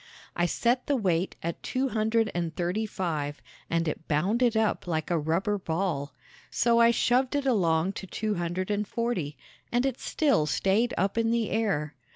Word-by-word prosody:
I 175 0 +2
set 245 +7 0
the 285 - +2
weight 185 -6 0
at 170 0 -3
two 265 +1 -1
hundred 220 0 +1
and 170 -2 -2
thirty 180 +5 -1
five 150 -7 -3 0.3
and 165 0 0
it 155 - -4
bounded 220 +10 +2
up 220 -4 0
like 160 -1 -2
a 170 - +2
rubber 190 +7 0
ball; 160 -6 -2 0.3
so 235 -1 +3
I 235 0 +7
shoved 250 +3 +2
it 285 -1 0
along 180 -8 +2
to 190 - -9
two 215 +4 -2
hundred 175 +2 -2
and 205 0 -1
forty 225 - -2 0.3
and 245 +2 +2
it 265 -2 -1
still 275 - +1
stayed 205 +9 +1
up 195 +5 +1
in 225 0 +2
the 230 -1 0
air. 195 -10 0
195 Hz, 180 wpm, -28 LUFS, 165-230 Hz, 0.3 s, I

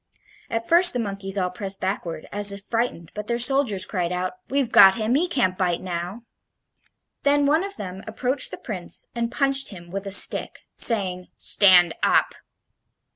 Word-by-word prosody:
At 230 0 -4
first 350 +1 +5
the 250 - -3
monkeys 195 -2 -2
all 180 -2 -1
pressed 195 +1 -5
backward, 175 -4 -5
as 205 0 +3
if 200 0 -8
frightened, 225 -8 -3
but 210 0 -7
their 235 - -1
soldiers 240 -6 +1
cried 180 -4 -3
out: 180 0 -3 0.2
"We've 270 -3 -1
got 190 0 +7
him; 225 +1 -2
he 320 +7 +1
can't 240 - -1
bite 175 -2 0
now." 180 +5 -6 1.0
Then 285 0 +2
one 310 +5 +2
of 395 0 -7
them 190 - -8
approached 260 +2 0
the - - -8
Prince 185 -6 -5
and 235 0 -3
punched 275 +1 +2
him 175 -4 -12
with 195 +1 -6
a - - -5
stick, 195 - +4
saying, 185 -6 +1
"Stand 180 -4 +4
up!" - - +2
205 Hz, 175 wpm, -22 LUFS, 185-245 Hz, 1.0 s, got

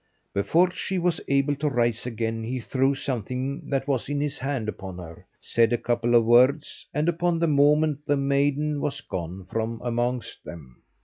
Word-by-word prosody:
Before 170 - +3
she 190 +1 -3
was 175 -1 0
able 140 +1 +2
to 150 +1 0
rise 120 -2 0
again 115 -1 -3
he 125 +3 -3
threw 135 +3 +1
something 135 - -4
that 135 -1 -1
was 130 -4 -1
in 145 0 -1
his 145 -1 -2
hand 130 -4 -2
upon 95 -4 -6
her, 85 -2 -11
said 115 0 +2
a 120 - +2
couple 120 0 +1
of 115 -1 +5
words, 130 +5 +3
and 150 +2 -1
upon 175 0 +1
the 170 - +1
moment 150 0 +3
the 145 - +2
maiden 140 +2 +1
was 145 -1 -2
gone 90 0 -6
from 115 +4 -3
amongst 120 0 -2
them. 70 -7 -11
135 Hz, 180 wpm, -25 LUFS, 115-145 Hz, -, of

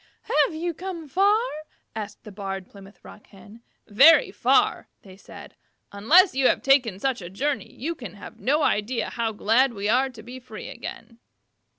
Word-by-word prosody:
"Have 315 - -6
you 340 +2 -3
come 340 -1 -7
far?" 400 +7 +3 0.6
asked 210 -2 -7
the 210 - -11
Barred 195 -1 -6
Plymouth 195 0 -16
Rock 210 - -14
Hen. 205 +3 -16 0.3
"Very 290 - +6
far," - - +1 0.3
said 195 - -13
they. - - -24
"Unless 345 - +5
you 265 0 +2
have - - +1
taken 255 -8 +3
such 260 +1 -2
a 175 - -8
journey 275 +9 -3
you 320 +6 -5
can 240 - -10
have 210 +2 -12
no 295 +6 +1
idea 220 +4 -1
how 230 -1 -2
glad 230 +5 +2
we 200 0 -3
are 255 +5 +2
to 230 -4 -13
be 250 +3 -10
free 240 -4 -10
again." 230 0 -10
240 Hz, 175 wpm, -24 LUFS, 205-290 Hz, 0.6 s, Very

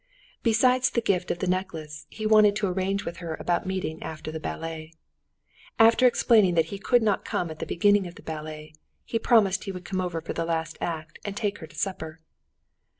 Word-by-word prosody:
Besides 250 +3 +3
the - - 0
gift 195 -6 0
of - - -1
the 185 - -3
necklace 160 -5 -3
he 215 - -6
wanted 215 -1 +6
to 210 -1 0
arrange 190 +2 -1
with 170 - -5
her 170 -2 -5
about 175 +1 -1
meeting 185 -4 -3
after 155 0 -6
the 160 - -5
ballet. 160 0 -6 0.8
After 230 +3 +6
explaining 215 -6 +4
that 165 -1 +4
he 200 - -5
could 240 +4 +3
not 210 -3 +1
come 170 -2 -2
at 155 - -9
the - - -4
beginning 205 +1 +3
of 175 - -11
the - - -14
ballet, 155 -1 -7 0.3
he 230 - -1
promised 200 -6 +3
he 195 - -3
would 180 -1 -8
come 185 -2 -2
for 165 -2 -5
the 165 - -2
last 160 -1 -2
act 165 -1 -4
and 200 -1 -5
take 205 -2 -2
her 160 - -9
to 155 - -18
supper. 160 -2 -4
180 Hz, 205 wpm, -26 LUFS, 160-205 Hz, 0.8 s, wanted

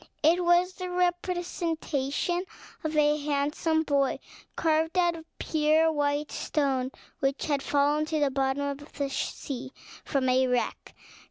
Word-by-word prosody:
It 340 +4 +4
was 350 +1 +4
the 365 -1 -5
representation 350 -3 -1 0.4
of 310 -1 -2
a 295 0 +4
handsome 295 +2 0
boy, 280 -3 +1 0.4
carved 320 +1 +1
out 345 -1 +3
of 325 -1 -10
pure 315 +1 +3
white 290 0 0
stone, 265 -4 0 0.3
which 270 0 0
had 285 -3 0
fallen 290 +2 +2
to 310 0 -1
the 285 -2 +2
bottom 270 +1 0
of 285 +1 -5
the 280 -2 -2
sea 265 -1 -4 0.3
from 270 -3 0
a 255 +1 +3
wreck. 250 -1 -2
300 Hz, 140 wpm, -28 LUFS, 280-325 Hz, 0.4 s, It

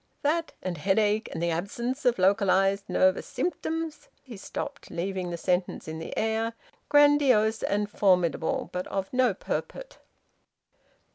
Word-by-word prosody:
That, 325 +3 0
and 180 -4 -3
headache, 205 +4 +1
and 165 - -4
the 170 - +1
absence 235 - -3
of 245 -1 +3
localised 195 0 +2
nervous 185 +1 +2
symptoms 325 -2 -3
" - - -39
He 255 -4 -10
stopped, 280 +8 -6
leaving 185 +1 -3
the 170 - -4
sentence 180 0 -1
in 160 0 -5
the 165 - -7
air, 225 +1 0 0.4
grandiose 280 -7 +4
and 205 +1 0
formidable, 180 -5 +1
but 180 0 -3
of 195 +2 -4
no 250 -5 +3
purport. - - -5
205 Hz, 140 wpm, -27 LUFS, 185-255 Hz, 0.4 s, grandiose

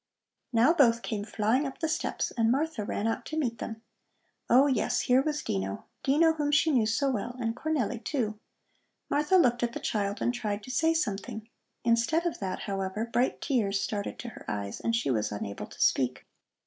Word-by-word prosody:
Now 245 +6 +5
both 235 -7 +4
came 210 -3 -3
flying 220 +6 +1
up 270 - -8
the 320 - 0
steps, 320 +2 -1
and 225 -1 +2
Martha 285 -3 0
ran 205 +1 -2
out 225 - -1
to 315 - -4
meet 235 -7 -1
them. 225 0 -6 0.7
Oh, 260 +4 +7
yes, 260 -6 +1
here 255 +1 +4
was 295 +1 -2
Dino, 95 0 -3 0.2
Dino 320 +4 +4
whom 295 -2 -1
she 300 +2 +4
knew 240 -6 +3
so 270 +5 +1
well, 240 +1 -3
and 230 -1 -1
Cornelli, 250 -7 -1
too 215 -6 -2 0.7
Martha 300 +6 +2
looked 245 -8 +3
at 235 -1 0
the - - -4
child 205 -1 -1
and 240 - +1
tried 210 -4 -3
to 255 - -7
say 325 +4 +2
something. 220 -5 -3 0.4
Instead 235 +8 +2
of 345 - -2
that, 185 -2 -3
however, 195 +2 -2
bright 240 +2 0
tears 210 -9 +1
started 205 0 -3
to 240 - -6
her - - -12
eyes, 100 -1 -3
and 230 - 0
she 230 - 0
was 110 -4 0
unable 100 -1 -5
to - - -15
speak. 130 -1 +2
235 Hz, 195 wpm, -29 LUFS, 210-280 Hz, 0.7 s, Oh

